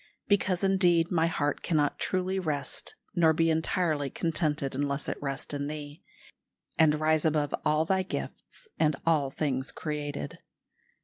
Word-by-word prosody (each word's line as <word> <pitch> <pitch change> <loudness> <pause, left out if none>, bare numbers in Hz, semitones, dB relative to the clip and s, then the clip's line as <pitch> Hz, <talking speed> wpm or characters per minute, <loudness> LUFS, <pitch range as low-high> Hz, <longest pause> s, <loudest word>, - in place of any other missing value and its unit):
"Because, 195 -2 +1
indeed, 180 -4 +3
my 165 -2 +3
heart 145 -3 -1
cannot 150 -4 +1
truly 185 +1 0
rest 145 -6 -2 0.2
nor 165 -4 +4
be 165 +1 +2
entirely 160 -2 0
contented 155 -3 0
unless 140 +1 -2
it - - -4
rest 140 0 -3
in 145 0 -2
Thee, 150 0 -7 0.7
and 155 -1 +4
rise 155 0 +2
above 150 -2 +1
all 155 +1 +2
Thy 190 +2 +2
gifts 325 - -6
and 155 -2 +3
all 155 -5 +2
things 135 -2 -2
created. 150 +1 -5
155 Hz, 140 wpm, -29 LUFS, 145-170 Hz, 0.7 s, nor